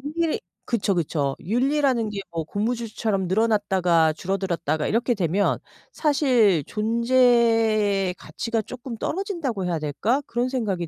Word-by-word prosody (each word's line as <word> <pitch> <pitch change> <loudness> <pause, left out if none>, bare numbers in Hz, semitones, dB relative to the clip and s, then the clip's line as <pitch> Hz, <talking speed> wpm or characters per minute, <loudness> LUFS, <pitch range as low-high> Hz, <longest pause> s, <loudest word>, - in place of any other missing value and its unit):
윤리 335 -2 0 0.3
그쵸, 215 -4 0
그쵸. 145 -5 -1
윤리라는 255 - +1
게 205 -1 -5
뭐 165 -1 -3
고무줄처럼 215 0 -2
늘어났다가 185 -6 +2
줄어들었다가 170 -4 -2
이렇게 240 +2 +1
되면 190 +1 +1 0.3
사실 250 - +3
존재의 225 -4 +2
가치가 230 +4 -3
쪼끔 245 +2 -8
떨어진다고 325 - -3
해야 170 -2 -1
될까 180 - 0
그런 240 +2 -1
생각이 205 -10 -2
215 Hz, 315 characters per minute, -24 LUFS, 185-245 Hz, 0.3 s, 사실